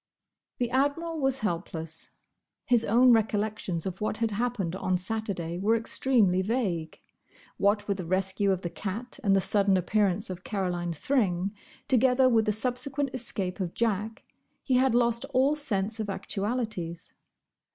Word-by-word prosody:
The 245 -1 -1
Admiral 300 +5 0
was 270 -1 0
helpless. 165 -3 -2 0.6
His 240 -2 +3
own 245 +4 +5
recollections 210 -5 -1
of 190 +1 -5
what 215 0 -1
had 230 -1 0
happened 205 -5 -2
on 185 -1 0
Saturday 180 -4 -3
were 215 +4 +2
extremely 225 -5 +2
vague. 190 -7 -2 0.6
What 205 +1 +1
with 200 -2 0
the 180 - -5
rescue 190 +3 +1
of 190 -1 -2
the 175 - -3
cat 215 +9 -5
and 195 -2 +4
the 195 - +3
sudden 195 0 +3
appearance 195 +1 0
of 180 0 -8
Caroline 180 -7 -2
Thring, 195 - 0 0.3
together 255 +1 +4
with 225 -3 +3
the 215 - +2
subsequent 255 +5 -1
escape 205 -6 -1
of 180 -3 -3
Jack, 220 -1 -1 0.4
he 265 - -1
had 260 -2 +3
lost 235 -1 +2
all 270 +4 +4
sense 220 -7 +1
of 215 -2 -3
actualities. 200 -3 -4
210 Hz, 150 wpm, -28 LUFS, 185-245 Hz, 0.6 s, own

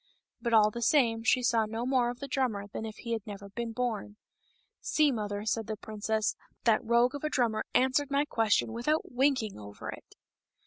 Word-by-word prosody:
But 235 - -1
all 215 -1 +6
the 235 - -6
same, 235 -4 +3
she 250 +2 +3
saw 230 -2 +2
no 225 +2 -3
more 255 -2 +2
of 245 0 -6
the 280 - -5
drummer 250 -7 -1
than 220 +2 -6
if 215 - -8
he 235 - -7
had 225 -1 0
never 200 -1 -8
been 235 +3 -4
born. 220 -3 -3 0.3
" - - -38 0.3
See, 305 -2 +3
mother," 205 -3 -3
said 220 0 -1
the 215 -1 -3
princess, 215 +1 -1
" - - -42
that 225 -1 +4
rogue 235 +2 +3
of 285 - -6
a 305 - 0
drummer 230 -6 0
answered 265 +2 +3
my 280 +1 +2
question 225 -4 +1
without 300 +7 -1
winking 250 - +1
over 100 0 -8
it." - - -12
230 Hz, 210 wpm, -30 LUFS, 215-255 Hz, 0.3 s, all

